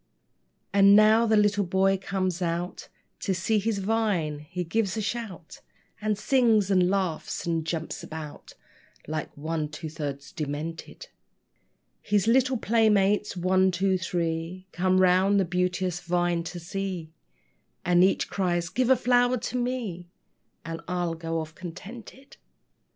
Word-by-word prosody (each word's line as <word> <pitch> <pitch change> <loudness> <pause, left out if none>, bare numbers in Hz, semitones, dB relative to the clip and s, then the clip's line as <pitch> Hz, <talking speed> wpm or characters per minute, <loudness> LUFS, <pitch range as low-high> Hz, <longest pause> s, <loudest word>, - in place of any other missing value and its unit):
And 200 0 +7
now 215 +2 +6
the 220 -1 +4
little 205 -1 +3
boy 190 +1 +2
comes 185 -2 -2
out 175 +1 -3 0.3
To 190 - -1
see 210 +5 +1
his 215 +1 -1
vine. 195 -7 0
He 175 +4 -5
gives 200 +4 -1
a - - 0
shout, 205 -6 -5 0.4
And 210 -1 0
sings 220 -4 +3
and 180 -2 +4
laughs, 185 -5 -2
and 165 -1 0
jumps 160 0 -4
about 155 -2 -9 0.5
Like 155 0 -3
one 155 0 -3
two 155 +1 -7
thirds 145 -3 -5
demented. 155 +1 -6 0.9
His 205 -1 +1
little 255 +2 +3
playmates, 210 -3 +2
one, 185 +1 +3
two, 190 +1 +1
three, 170 0 -3
Come 185 +1 +2
round 185 +2 +4
the 190 - +2
beauteous 180 0 -1
vine 175 -1 0
to 175 +1 -6
see, 180 -2 -5 0.7
And 175 0 +5
each 190 - +2
cries, 175 -3 -1
"Give 245 +7 0
a 260 - +7
flower 245 0 +3
to 245 - -5
me, 240 -9 -3 0.6
And 165 0 -5
I'll 175 -2 -1
go 165 0 -3
off 155 -1 -6
contented." 205 +10 -10
185 Hz, 140 wpm, -26 LUFS, 170-210 Hz, 0.9 s, And